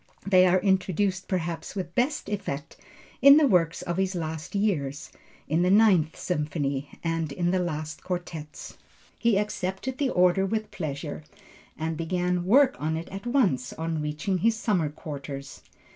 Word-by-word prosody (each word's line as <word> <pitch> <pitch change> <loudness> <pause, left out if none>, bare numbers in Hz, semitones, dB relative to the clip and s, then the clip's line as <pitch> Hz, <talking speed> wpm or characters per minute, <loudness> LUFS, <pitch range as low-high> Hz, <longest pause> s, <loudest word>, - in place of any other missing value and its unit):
They 185 -2 +5
are 185 +1 +4
introduced 190 0 +1
perhaps 170 -2 -3
with 180 -3 -4
best 265 +8 0
effect 195 -9 -4 0.5
in 280 +1 +9
the 310 - +5
works 175 - +2
of 175 0 -3
his 190 0 0
last 160 +1 -5
years, 150 -9 -1 0.4
in 160 +3 +1
the 180 - +3
Ninth 190 -6 +4
Symphony, 145 -4 -2
and 165 -2 -1
in 175 +4 0
the 185 - +2
last 155 -3 -4
quartets. 165 -4 -6 0.4
He 230 -4 +3
accepted 210 +4 -3
the 280 -2 +1
order 180 -2 +3
with 215 +2 -2
pleasure 150 -3 -5 0.5
and 160 +1 -2
began 180 +1 -1
work 260 +7 +5
on 160 +2 -1
it 165 - -6
at 195 +4 -7
once 195 - +1
on 160 -1 -3
reaching 150 +6 -2
his 225 +5 +3
summer 200 -8 0
quarters. 140 -2 -8
180 Hz, 155 wpm, -26 LUFS, 155-200 Hz, 0.5 s, in